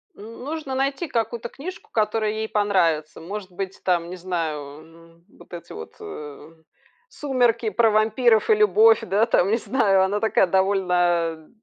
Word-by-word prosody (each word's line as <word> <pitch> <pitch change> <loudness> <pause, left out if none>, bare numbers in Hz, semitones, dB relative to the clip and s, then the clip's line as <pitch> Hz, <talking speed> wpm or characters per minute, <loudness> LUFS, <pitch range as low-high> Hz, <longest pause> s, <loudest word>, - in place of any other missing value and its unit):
Н 230 +2 -11
нужно 295 -2 -5
найти 275 +5 -1
какую-то 235 -1 -3
книжку, 355 +7 -9
которая 215 0 0
ей 220 +1 -3
понравится. 170 -7 0
Может 190 +3 -7
быть, 190 +1 -6
там, 175 -2 0
не 185 - -6
знаю, 170 -4 -3 0.2
м, 165 +1 -20
вот - - -17
эти 170 -1 -9
вот, 80 - -10
э, 150 - -9 0.6
"Сумерки" 245 - 0
про 225 +3 +3
вампиров 220 - +2
и 440 - +6
любовь, 430 +1 +5
да, 200 +4 +1
там, 200 -4 +2
не 225 - +2
знаю. 205 -6 +2
Она 200 +2 0
такая 220 -2 +2
довольно 175 -4 +1
205 Hz, 155 wpm, -23 LUFS, 175-235 Hz, 0.6 s, и